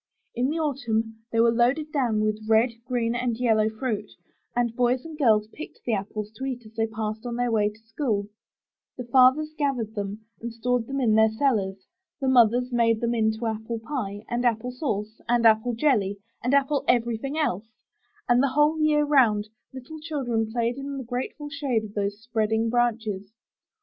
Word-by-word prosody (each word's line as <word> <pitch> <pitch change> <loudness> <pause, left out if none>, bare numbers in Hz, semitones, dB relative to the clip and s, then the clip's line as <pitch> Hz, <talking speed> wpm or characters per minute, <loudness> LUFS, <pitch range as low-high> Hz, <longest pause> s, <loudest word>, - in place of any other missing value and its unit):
In 250 +3 0
the 315 - -1
Autumn 225 -7 -1
they 230 - +1
were 230 0 +5
loaded 255 +6 +1
down 240 -7 +1
with 215 0 -1
red, 225 +2 +4
green 235 -2 0
and 240 -1 -1
yellow 220 -3 +2
fruit, 220 -1 -3 0.5
and 240 -1 0
boys 250 +2 +1
and 325 -1 -8
girls 220 -8 +3
picked 310 - -9
the 235 - 0
apples 210 +1 -3
to 265 - -4
eat 250 -3 -4
as 215 - -14
they 225 0 0
passed 220 0 -4
on 240 -1 -4
their 245 0 0
way 210 -2 +2
to 210 - -15
school; 225 -4 -1 0.7
the 250 - -4
fathers 260 +5 +4
gathered 265 -8 -1
them 205 +1 -5 0.2
and 235 +1 -4
stored 235 0 -1
them 275 0 -2
in 235 -5 +3
their 220 0 +5
cellars; 215 -6 0 0.3
the 270 - -1
mothers 245 0 +4
made 230 -2 +2
them 235 +1 0
into 220 0 0
apple 220 +1 -3
pie, 220 -4 -5
and 240 +1 -1
apple 240 +1 +1
sauce, 220 -5 -4
and 240 -1 +3
apple 225 +2 +4
jelly, 220 -7 +1 0.3
and 250 +4 +2
apple 280 0 +2
everything 240 +4 +1
else; 220 - -1 0.6
and 245 +1 +4
the 275 - +2
whole 300 +2 +4
year 300 -1 +3
'round, 225 -8 +3 0.2
little 265 +4 -9
children 245 -8 -2
played 235 +1 -1
in 275 0 -5
the 265 - -4
grateful 250 +5 -4
shade 275 -6 -1
of 210 -1 -9
those 205 0 -2
spreading 225 0 0
branches. 220 -5 -1
235 Hz, 185 wpm, -25 LUFS, 220-260 Hz, 0.7 s, were